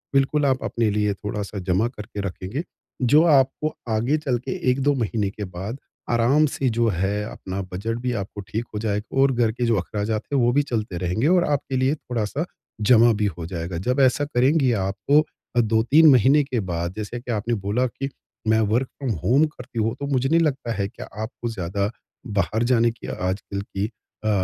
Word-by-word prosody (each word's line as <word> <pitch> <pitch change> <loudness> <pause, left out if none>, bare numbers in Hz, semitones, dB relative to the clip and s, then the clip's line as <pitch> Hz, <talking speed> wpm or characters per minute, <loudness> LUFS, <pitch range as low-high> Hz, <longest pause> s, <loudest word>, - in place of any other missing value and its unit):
बिल्कुल 140 +2 +3
आप 130 -1 +1
अपने 115 -2 0
लिए 105 0 +1
थोड़ा-सा 105 0 -5
जमा 95 +5 +1
करके 105 -3 -7
रखेंगे, 100 - -4 0.4
जो 145 +5 +5
आपको 150 0 +3 0.2
आगे 115 +6 +1
चल 135 -5 -1
के 125 - -6 0.2
1-2 135 +3 +2
महीने 110 -4 -1
के 105 +1 -7
बाद 95 +7 -6 0.3
आराम 120 +6 +4
से 135 - 0
जो 115 0 +3
है 100 +2 -1
अपना 95 +1 -5
बजट 115 +5 -2
भी 125 - 0
आपको 100 +1 -7
ठीक 115 +2 -3
हो 105 - -2
जाएगा 105 +3 -2
और 135 0 +5
घर 120 -3 +2
के 120 +2 -2
जो 115 -1 +3
अख़राजात 105 +3 -2
है 140 - +3
वो 120 -1 +3
भी 145 - +4
चलते 110 -9 -3
रहेंगे 90 +10 +1
और 180 +1 +4
आपके 140 -2 -1
लिए 130 +3 +2
थोड़ा-सा 125 +2 -3 0.4
जमा 120 -1 +7
भी - - +3
हो 85 - -5
जाएगा, 85 -1 -4
जब 125 +10 0
ऐसा 135 +2 +4
करेंगी 135 0 +3
आपको 120 +5 +1
2-3 115 +8 +5
महीने 135 +4 +5
के 130 -3 -2
बाद 85 +1 -2
जैसे 110 +3 -4
कि 120 +1 -6
आपने 115 +1 -1
बोला 120 +6 +1
की 135 +3 -5 0.4
मैं 110 0 +4
वर्क 125 +2 +2
फ्रॉम 135 -4 -2
होम 140 +6 +4
करती 125 -6 -7
हूँ, 110 +2 0
तो 140 +2 -5
मुझे 135 -1 +1
नहीं 165 +2 +4
लगता 140 -6 0
है 100 -1 -1
कि - - -9
आपको 115 +2 -5
ज़्यादा 100 0 -2 0.5
बाहर 110 +3 0
जाने 115 -1 +4
की 115 - -11
आजकल 95 +2 -3
की 100 +1 -3 0.4
अ, - - +2
115 Hz, 195 wpm, -23 LUFS, 105-135 Hz, 0.5 s, जमा